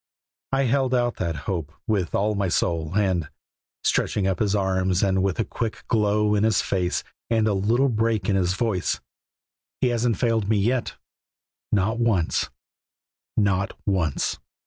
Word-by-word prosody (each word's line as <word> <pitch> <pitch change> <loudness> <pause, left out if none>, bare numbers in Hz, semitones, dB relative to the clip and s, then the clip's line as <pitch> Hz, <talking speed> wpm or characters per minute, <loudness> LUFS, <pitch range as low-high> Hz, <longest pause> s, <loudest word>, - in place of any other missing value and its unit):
I 135 0 +2
held 130 0 +1
to 120 -2 +2
that 85 -3 -2
hope 85 -6 -3
with 95 -6 0
all 105 +2 +1
my 100 -1 0
soul, 85 0 0
and" 90 -7 +1 0.5
stretching 100 - +1
up 95 -2 0
his 105 -1 +1
arms, 95 -1 +1
and 95 -1 +2
with 95 -1 0
a 115 - 0
quick 115 -1 -4
glow 105 -1 +2
in 105 0 +2
his 110 -1 +3
face 90 -2 0 0.3
and 110 -2 +2
a 105 - +2
little 115 +8 +2
break 110 -4 0
in 100 - +2
his 90 -1 +1
voice 110 -5 0 0.8
"He 125 - +2
hasn't 120 -2 +1
failed 115 -4 +1
me 110 - +3
yet; 120 +5 0 0.8
not 105 +3 +1
once, 110 -8 +1 0.9
not 100 -2 +1
once!" 90 -8 0
100 Hz, 155 wpm, -24 LUFS, 95-115 Hz, 0.9 s, his